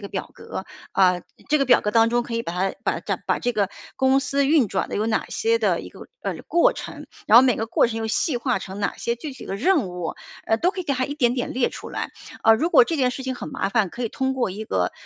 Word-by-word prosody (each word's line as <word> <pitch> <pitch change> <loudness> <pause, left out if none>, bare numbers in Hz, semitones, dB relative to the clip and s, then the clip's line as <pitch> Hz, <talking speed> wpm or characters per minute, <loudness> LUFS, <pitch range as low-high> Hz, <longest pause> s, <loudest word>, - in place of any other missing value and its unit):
一 - - -18
个 200 - -6
表 - - -4
格， - - -7 0.3
啊， 180 -2 +3 0.3
这 305 - +4
个 275 - +2
表 245 -2 +5
格 210 - -1
当 225 +1 +4
中 240 0 +2
可 235 - -6
以 230 - -1
把 170 - -5
它 190 +2 -1
把 - - 0 0.3
把 - - +1
这 245 - -1
个 200 -2 +1 0.3
公 265 +1 +3
司 280 0 0
运 285 -6 +4
转 190 - -2
的 - - -2
有 215 +2 0
哪 220 - 0
些 455 +1 +1
的 - - +1
一 - - -9
个， - - -15 0.2
哎， - - -3
过 340 - +3
程， - - -8 0.2
然 220 - +8
后 - - +8
每 255 -3 +3
个 225 - -1
过 230 - +3
程 225 - -4
又 225 - -2
细 245 +5 0
化 245 +1 0
成 195 +1 -8
哪 200 - -2
些 235 0 -1
具 285 +4 -7
体 260 - -11
的 195 - -3
任 285 - +2
务， 180 -2 -4 0.3
哎 225 - +1
都 355 - +2
可 375 -1 -5
以 - - -18
给 285 - 0
它 255 -1 0
一 285 - -5
点 245 -5 +2
点 245 -1 -3
列 250 -1 +1
出 - - -8
来， - - -4 0.3
啊， 225 - +7
如 300 +10 +2
果 470 +6 +7
这 335 - -2
件 250 -1 +3
事 265 - -6
情 260 0 -3
很 - - -7
麻 260 -8 -2
烦， 215 -3 +2
可 240 - -7
以 230 - -2
通 265 0 -1
过 245 -6 0
一 210 +4 -6
个， 90 - 0
240 Hz, 310 characters per minute, -23 LUFS, 210-270 Hz, 0.3 s, 然